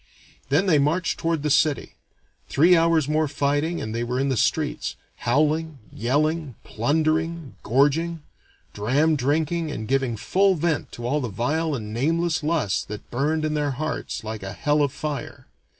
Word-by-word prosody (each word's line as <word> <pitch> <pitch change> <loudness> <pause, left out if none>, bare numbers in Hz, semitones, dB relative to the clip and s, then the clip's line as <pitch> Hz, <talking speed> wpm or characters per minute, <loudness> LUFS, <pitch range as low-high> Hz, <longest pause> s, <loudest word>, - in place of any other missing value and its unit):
Then 150 +8 +3
they 165 -6 +4
marched 165 +5 0
toward 165 -3 -1
the 150 - 0
city. 145 +1 +2 0.6
Three 170 +6 +5
hours' 165 -3 +3
more 155 +1 +1
fighting 145 +4 0
and 110 - -4
they 115 +1 -1
were 125 +2 -2
in 135 +1 +1
the 130 - +1
streets, - - 0 0.2
howling, 155 +4 +1 0.2
yelling, 145 +3 0
plundering, 155 +4 0
gorging, 145 +6 +1 0.5
dram 140 +10 +2
drinking, 155 +4 0
and 110 -7 -5
giving 130 -3 0
full 195 - +2
vent 160 -1 -1
to 120 - -7
all 145 +5 0
the 125 - -3
vile 145 +9 -1
and 105 -4 -6
nameless 165 +7 +1
lusts 150 - 0
that 105 0 -9
burned 155 +5 0
in 155 - -1
their 145 -2 0
hearts 155 -5 -3
like 110 0 -5
a 100 0 -6
hell 150 0 +1
of 140 -2 +2
fire. 145 -2 -5
150 Hz, 165 wpm, -24 LUFS, 130-160 Hz, 0.6 s, Three